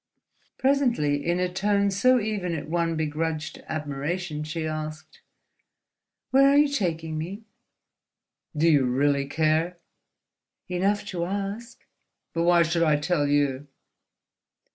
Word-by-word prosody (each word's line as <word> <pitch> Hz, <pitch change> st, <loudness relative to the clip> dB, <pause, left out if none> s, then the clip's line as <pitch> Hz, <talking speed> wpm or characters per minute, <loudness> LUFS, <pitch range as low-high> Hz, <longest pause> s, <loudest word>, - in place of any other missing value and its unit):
Presently, 235 Hz, -, +1 dB
in 175 Hz, +3 st, 0 dB
a 180 Hz, -, +1 dB
tone 200 Hz, +2 st, +1 dB
so 255 Hz, +6 st, +4 dB
even 205 Hz, -6 st, -2 dB
it 150 Hz, -, -5 dB
won 165 Hz, 0 st, 0 dB
begrudged 160 Hz, 0 st, -3 dB
admiration, 150 Hz, +2 st, -3 dB
she 155 Hz, +1 st, -4 dB
asked: 155 Hz, 0 st, -6 dB, 1.1 s
"Where 275 Hz, +1 st, +6 dB
are 280 Hz, -, +4 dB
you 295 Hz, 0 st, +5 dB
taking 165 Hz, -, -2 dB
me?" 190 Hz, +7 st, -6 dB, 1.1 s
"Do 160 Hz, +3 st, +3 dB
you 145 Hz, -5 st, +4 dB
really 140 Hz, +2 st, +1 dB
care?" 160 Hz, +4 st, +1 dB, 0.9 s
"Enough 195 Hz, +3 st, 0 dB
to 170 Hz, -2 st, -2 dB
ask." 205 Hz, +5 st, -5 dB, 0.5 s
"But 165 Hz, 0 st, 0 dB
why 175 Hz, -1 st, +5 dB
should 170 Hz, +1 st, 0 dB
I 155 Hz, -2 st, +4 dB
tell 150 Hz, 0 st, 0 dB
you?" 145 Hz, -1 st, 0 dB
165 Hz, 120 wpm, -25 LUFS, 155-195 Hz, 1.1 s, Where